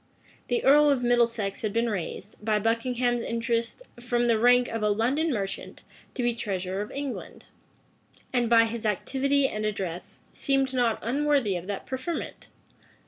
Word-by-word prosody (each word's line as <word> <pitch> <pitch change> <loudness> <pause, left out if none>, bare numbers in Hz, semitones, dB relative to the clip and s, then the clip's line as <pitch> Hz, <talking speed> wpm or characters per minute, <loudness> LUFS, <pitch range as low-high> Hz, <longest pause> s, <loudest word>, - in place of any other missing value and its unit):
The 475 - 0
earl 295 +2 +6
of 270 -3 +1
Middlesex 235 -4 +1
had 215 - -1
been 230 +3 +1
raised, 205 0 -5
by 215 -1 +2
Buckingham's 240 +2 0
interest, 230 - -2 0.2
from 240 0 0
the 230 -2 +3
rank 245 +1 +5
of 225 - -4
a 210 - +2
London 260 +10 +1
merchant, 195 -5 -4 0.3
to 250 - -2
be 240 0 +2
treasurer 190 -3 -3
of 210 - -5
England; 280 -2 -6 0.9
and, 240 -2 +1
by 230 -1 +6
his 225 0 -5
activity 270 +6 +1
and 215 -3 -4
address, 190 -5 -4
seemed 270 -1 0
not 240 -3 +2
unworthy 275 -4 +1
of 175 +1 -5
that 200 -1 -4
preferment. 260 +6 -5
235 Hz, 155 wpm, -27 LUFS, 215-260 Hz, 0.9 s, earl